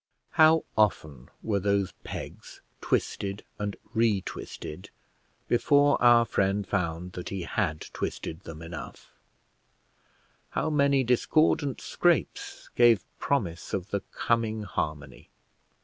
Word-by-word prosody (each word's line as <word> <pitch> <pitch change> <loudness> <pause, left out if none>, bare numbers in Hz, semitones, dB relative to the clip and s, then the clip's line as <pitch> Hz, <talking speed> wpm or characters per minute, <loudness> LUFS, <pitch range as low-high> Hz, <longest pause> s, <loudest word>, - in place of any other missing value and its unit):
How 160 0 +5
often 80 - 0
were 105 -3 0
those 100 -1 +1
pegs - - -8 0.2
twisted 100 +1 -1 0.2
and 105 -1 -2 0.2
re 110 -4 +3
twisted 80 -1 -8 0.6
before 145 +4 +3
our 120 -1 +6
friend 100 -1 0
found 90 -2 -2
that 90 -1 -6
he 95 -2 -4
had 80 -3 -1
twisted 80 - -4
them 80 -4 -10
enough; 85 0 -9 1.5
how 155 - +1
many 140 -2 +3
discordant 140 +3 +2
scrapes 170 - 0
gave 120 -4 +5
promise 95 -12 -1
of 95 +2 -5
the 100 - +1
coming 110 -2 0
harmony. 75 -8 -4
100 Hz, 110 wpm, -28 LUFS, 90-120 Hz, 1.5 s, our